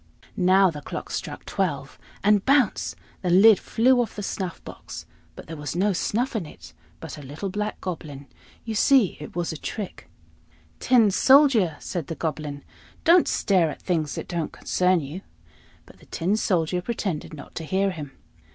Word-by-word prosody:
Now 185 0 +4
the 150 -2 -8
clock - - -7
struck - - -5
twelve 145 -8 -3 0.2
and, 205 -1 +4
bounce! 270 -6 +2 0.3
the 180 - -1
lid 195 +3 +7
flew 245 +2 +3
off 235 - -4
the 205 - -5
snuff 185 -3 -4
box; - - -9 0.3
but - - -10
there 165 - -7
was 150 -1 -5
no 195 +3 +2
snuff 240 +8 -1
in 190 -8 -2
it, 85 - -14 0.3
but 150 - -8
a - - -9
little 145 +8 -6
black 210 +2 -3
Goblin: 150 -6 -6 0.4
you 225 - -3
see, 235 -2 +4
it 150 - -9
was 175 -2 -2
a - - -6
trick. 205 +5 -6 0.7
"Tin 235 -5 +4
Soldier!" 255 - +5
said 170 -5 -5
the 165 - -4
Goblin, 150 -3 -4 0.4
"don't 340 +1 +6
stare 180 -5 +2
at - - -7
things 160 -5 -1
that - - -6
don't 170 -3 -3
concern 180 -1 +1
you." 150 +7 -7 0.6
But - - -18
the - - -19
Tin 180 +5 0
Soldier 180 -4 0
pretended 185 -8 -4
not 145 - -12
to 165 - -5
hear 190 +4 0
him. 150 -6 -8
185 Hz, 175 wpm, -24 LUFS, 155-210 Hz, 0.7 s, lid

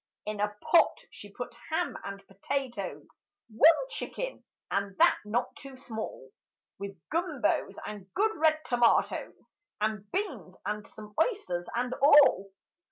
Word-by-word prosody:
In 210 0 -4
a 210 0 -1
pot 340 - +5
she - - -11
put - - -6 0.2
ham - - -1
and 200 0 -7
potatoes, 245 +6 -4 0.5
One 325 - +6
chicken, - - -5 0.3
and 200 -1 -1
that - - +5
not 220 +4 -1
too 275 -1 -11
small; 220 - -7 0.5
With 200 -2 -7
gumbos 330 -6 0
and 195 -3 -8
good 435 +3 +2
red 315 0 +3
tomatoes, 240 -1 +2 0.4
And 210 -1 -2
beans 410 +1 -3
and 210 -1 -3
some 210 -1 -12
oysters 180 - -1
and 250 +1 -1
all. 280 -9 +6
230 Hz, 130 wpm, -29 LUFS, 200-300 Hz, 0.5 s, One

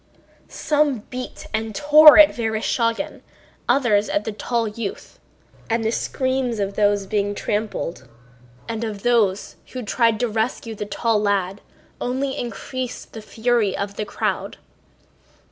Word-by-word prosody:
Some 295 -6 0
beat 255 0 -7
and 220 -1 -2
tore 300 +4 +8
at 305 -1 +8
Vereshchágin, 230 +4 -1 0.5
others 240 -5 +3
at 205 - 0
the 220 - -3
tall 230 +2 -1
youth. 210 -1 -6 0.5
And 225 0 0
the 220 - +1
screams 260 -1 -1
of 200 -1 -2
those 205 0 +2
that - - -9
were - - -19
being 205 -1 0
trampled 205 - -3
on 130 - -21 0.6
and 230 0 -3
of 210 -3 -5
those 215 -5 +1 0.2
who 255 -1 -5
tried 225 +1 +1
to 245 - +2
rescue 225 +1 -2
the 210 -1 -6
tall 215 +1 0
lad 200 -1 0 0.4
only 265 +2 -2
increased 245 +2 -6
the 220 - -7
fury 220 -2 0
of 200 0 -4
the 210 - -3
crowd. - - -3
225 Hz, 145 wpm, -22 LUFS, 205-245 Hz, 0.6 s, tore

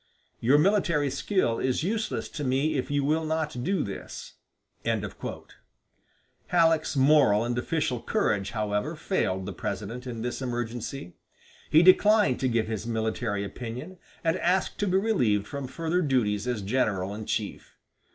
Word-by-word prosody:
Your 130 +5 +4
military 165 -5 +2
skill 140 - 0
is 130 +3 0
useless 220 +4 -2
to 150 - -5
me 135 +4 +1
if 130 - -2
you 145 -1 +1
will 155 +3 +1
not 155 -5 -2
do 190 +1 +1
this." 100 - -7 0.5
Halleck's 165 -3 -3
moral 135 -6 +5
and 120 0 -1
official 125 -1 -1
courage, 100 -2 0
however, 105 -2 -2
failed 95 0 -1
the - - -5
President 120 +5 -5
in 115 -2 -5
this 125 +2 -3
emergency. 120 -4 -4 0.6
He 160 +2 +6
declined 185 - +5
to 130 - +1
give 115 -2 +1
his 110 0 -4
military 110 -2 -1
opinion, 125 - -7 0.2
and 165 +1 +2
asked 180 +2 0
to 205 - +1
be 185 0 +3
relieved 125 - +2
from 140 +3 -5
further 165 +6 -1
duties 120 - +1
as 120 -5 -2
general 100 -4 0
in 110 +1 -7
chief. 105 -2 -4
130 Hz, 145 wpm, -27 LUFS, 110-160 Hz, 0.6 s, He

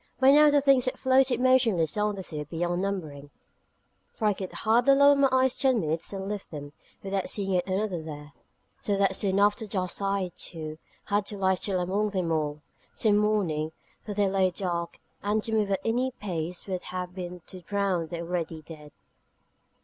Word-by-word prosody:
By 265 0 +7
now 300 +1 +7
the 290 -1 +4
things 275 -2 +4
that 255 - -2
floated 260 -2 +3
motionless 240 - +3
on 210 0 0
the 190 - -6
sea 155 -4 -5
were 150 - -4
beyond 175 +3 -2
numbering, 155 -8 -4 0.8
for 220 - -4
I 210 - +4
could 190 -1 -6
hardly 240 +5 +3
lower 280 +1 +7
my 275 -1 +4
eyes 260 0 +3
ten 260 -4 +2
minutes 160 -1 -2
and 195 -1 -5
lift 205 -1 -5
them, 145 -2 -8 0.3
without 195 -1 -2
seeing 195 -2 -1
yet 180 0 +1
another 190 -2 -1
there: 150 -1 -9 0.5
so 200 -1 -1
that 195 -1 +2
soon 195 -1 +1
after 205 +2 +2
dusk 185 -2 -2
I, 195 -2 -1
too, 155 -2 -7 0.3
had 205 0 0
to 205 - -3
lie 190 -1 +2
still 185 0 -1
among 195 +4 0
them 185 -4 -1
all, 150 -1 -1 0.3
till 215 -2 +2
morning: 195 -7 +1 0.3
for 210 -2 -6
they 205 -1 +2
lay 190 -1 +2
dark, 175 -2 -3 0.2
and 210 +1 0
to 225 - -3
move 215 -2 +1
at 195 - +1
any 245 +3 +1
pace 180 -7 -5
would 185 -2 -3
have 180 0 -5
been 180 -1 -7
to 185 - -10
drown 190 -2 -1
the 170 +1 -5
already 165 -2 -4
dead. 150 -2 -12
195 Hz, 195 wpm, -27 LUFS, 170-215 Hz, 0.8 s, By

